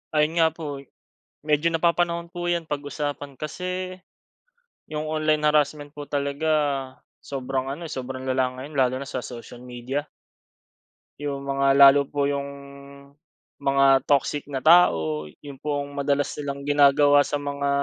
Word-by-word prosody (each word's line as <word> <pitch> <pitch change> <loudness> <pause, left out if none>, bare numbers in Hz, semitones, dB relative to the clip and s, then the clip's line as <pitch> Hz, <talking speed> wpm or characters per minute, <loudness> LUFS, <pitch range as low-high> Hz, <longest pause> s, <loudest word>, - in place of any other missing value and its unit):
Ayun 155 +2 +2
nga 165 - +6
po, 145 -4 -6
eh. 135 - -15 0.6
Medyo 150 +2 +1
napapanahon 170 0 +1
po 175 -1 -5
'yan 170 -2 -1
pag-usapan 145 -1 -4
kasi 180 +6 -5 0.9
yung 155 0 -4
online 155 -1 +1
harassment 150 -1 +1
po 145 - -6
talaga 140 +2 -2 0.8
sobrang 135 -1 -3
ano, 165 +2 -7
sobrang 130 -2 -5
lala 130 0 +1
ngayon 145 +2 -8
lalo 130 -1 +3
na 140 - -7
sa 130 - -4
social 120 0 -9
media. 125 +4 -4 1.1
Yung 140 -1 -4
mga 140 0 +3
lalo 140 0 +7
po 140 0 -1
yung 140 -1 -2 1.1
mga 135 -1 +3
toxic 145 +1 +1
na 135 -2 -4
tao, 80 - +4 0.2
yun 140 -2 -10
pong 145 0 -3
madalas 140 0 +1
nilang 140 -1 -4
ginagawa 145 0 +5
sa 145 - -2
mga 140 0 -2
145 Hz, 140 wpm, -24 LUFS, 140-155 Hz, 1.1 s, lalo